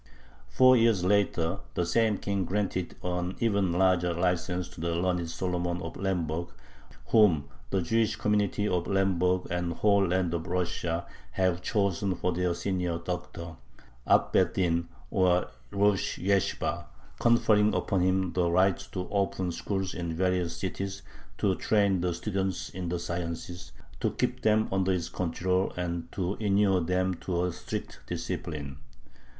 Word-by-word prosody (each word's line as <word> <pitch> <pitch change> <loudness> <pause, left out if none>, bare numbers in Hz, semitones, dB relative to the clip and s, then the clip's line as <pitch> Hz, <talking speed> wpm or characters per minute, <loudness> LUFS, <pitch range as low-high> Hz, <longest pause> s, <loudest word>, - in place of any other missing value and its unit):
Four 130 - +6
years 115 -5 +3
later 95 -2 +1 0.2
the 90 - +1
same 110 +2 +2
King 100 -1 -1
granted 95 -1 -2
an 90 0 -2
even 100 -5 +2
larger 90 -1 +2
license 90 0 0
to 90 - -11
"the 85 0 -1
learned 90 -1 0
Solomon 90 0 -2
of 80 - -6
Lemberg, 85 -3 -1 0.6
whom 90 -11 +4 0.2
the 95 +5 0
Jewish 115 +4 +1
community 105 0 +1
of 90 -3 0
Lemberg 95 -1 +1
and 90 -1 -1
the 85 - -4
whole 100 -1 +3
land 90 -1 0
of 85 +1 -3
Russia 85 -1 -1 0.3
have 90 -2 +1
chosen 100 -2 0
for 90 +1 -1
their 90 0 0
'senior 90 -3 -1
doctor' 85 -1 -6 0.5
(ab - - +4
beth 90 -1 +3
din, 85 -2 +1 0.2
or 90 -1 +2 0.2
rosh 100 +2 +1
yeshibah)," 95 0 0 0.3
conferring 110 -3 +4
upon 95 -2 0
him 95 0 +1
the 90 -2 +2
right 95 +1 +3
to 90 -2 -3
open 95 -2 0
schools 95 +2 -3
in 85 -2 -4
various 90 -1 0
cities, 95 +1 -4 0.3
"to 100 - +2
train 100 -4 +2
the 90 0 0
students 95 +1 -2
in 90 -1 -4
the 90 - -1
sciences," 85 -2 -5 0.3
to - - +1
keep - - -2
them 110 0 +3
under 95 0 +1
his 90 -3 -1
control, 90 +2 0
and 85 -2 -3
to 95 +1 -2
inure 100 -3 +3
them 90 +2 +1
to 90 0 -2
a 90 -1 -1
strict - - -6
discipline. 70 -4 -4
90 Hz, 150 wpm, -28 LUFS, 85-95 Hz, 0.6 s, Four